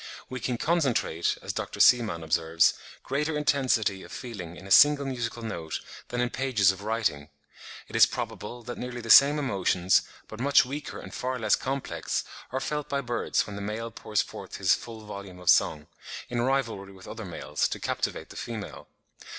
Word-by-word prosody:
We 130 - -4
can 125 -2 -2
concentrate, 135 - +1
as - - -3
Dr. - - -5
Seemann 110 -9 +5
observes, 80 +1 +3 0.3
greater 150 +3 -1
intensity 130 -9 +1
of - - -12
feeling 95 -9 -7
in 95 - -12
a 100 - -10
single 145 +3 +7
musical 120 -3 -4
note 85 -8 -4 0.3
than 120 0 -2
in 125 - 0
pages 115 -8 +3
of 95 - -9
writing. 105 -9 -1 0.6
It - - -10
is - - +8
probable 120 0 -6
that 120 +1 -7
nearly 125 -1 -5
the 115 -1 0
same 145 +2 +8
emotions, 95 -9 +2 0.3
but 110 - -9
much 140 +1 +5
weaker 145 +3 -6
and - - -10
far 130 0 -2
less 110 -3 +3
complex, 125 - -3 0.3
are 130 - -1
felt 150 +1 -3
by 140 0 0
birds 120 -2 0
when 105 - -8
the 100 - -5
male 110 +3 -4
pours 105 -2 -1
forth - - -9
his - - +3
full 110 -2 -6
volume 100 -3 -8
of 90 -1 +4
song, 75 -1 +2 0.4
in 120 -1 -1
rivalry 115 -7 -1
with 95 -1 -14
other 115 0 -7
males, 90 -4 -2
to - - -5
captivate - - -3
the - - -11
female. 110 -3 -6
115 Hz, 185 wpm, -27 LUFS, 95-130 Hz, 0.6 s, is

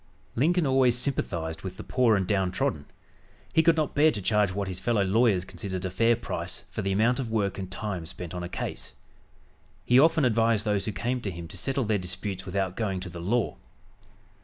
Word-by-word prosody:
Lincoln 165 +7 +2
always 130 -3 +3
sympathized 85 - -2
with 95 -1 -7
the - - -7
poor 125 -4 +3
and 95 -2 +1
down 95 -2 +1
trodden. 75 -5 -1 0.7
He 160 - +5
could 165 0 +4
not 155 -2 0
bear 150 +2 +5
to 115 - -2
charge 105 0 +2
what 100 +1 -3
his 95 -1 -4
fellow 105 +1 +1
lawyers 100 -2 +3
considered 95 -1 -5
a 95 - -2
fair 115 +5 +3
price 115 - -5
for - - -3
the 95 - -1
amount 115 +7 +2
of 125 -4 -3
work 100 -3 -1
and 95 -1 -5
time 95 -4 -4
spent 85 0 -7
on 90 - -4
a 85 - -5
case. 90 - -5 0.9
He 125 +1 +5
often 160 0 +5
advised 115 -2 +2
those 105 -2 +1
who 110 - -1
came 120 +6 -2
to 105 - -3
him 85 -2 -7
to - - -10
settle 135 +8 -1
their 105 -2 +1
disputes 95 +1 -5
without 95 -1 -1
going 100 -5 -1
to 90 -2 -7
law. 105 +7 0
100 Hz, 210 wpm, -27 LUFS, 95-120 Hz, 0.9 s, He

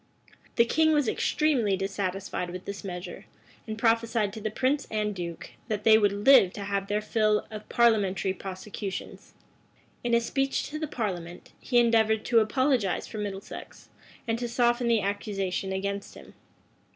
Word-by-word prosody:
The 235 - +5
king 315 +6 +3
was 295 -5 +2
extremely 245 -8 +1
dissatisfied 195 -1 -3
with 180 +1 -7
this 200 0 -6
measure, 180 +1 -7 0.4
and 215 0 -4
prophesied 225 -2 +1
to 220 - -7
the 215 - -1
prince 265 +6 0
and 210 -1 -1
duke, 170 -3 -6 0.2
that 210 -3 -2
they 220 -1 +7
would 205 -2 +4
live 245 -9 +7
to 205 - -6
have 200 0 -2
their 205 +1 0
fill 215 -1 +1
of 215 -1 -8
parliamentary 200 -5 +2
prosecutions.[*] 190 +1 -7 0.7
In 240 -1 +2
a - - +5
speech 270 +3 -1
to 305 - -4
the 310 - -2
parliament, 180 - -5
he 245 - 0
endeavored 225 -2 +3
to 235 -2 +4
apologize 225 - +1
for 215 - -7
Middlesex, 200 -1 -7 0.4
and 225 0 0
to 240 - -2
soften 240 0 +2
the 230 -2 +3
accusation 195 -1 -2
against 200 +1 -3
him. - - -13
215 Hz, 160 wpm, -27 LUFS, 195-235 Hz, 0.7 s, they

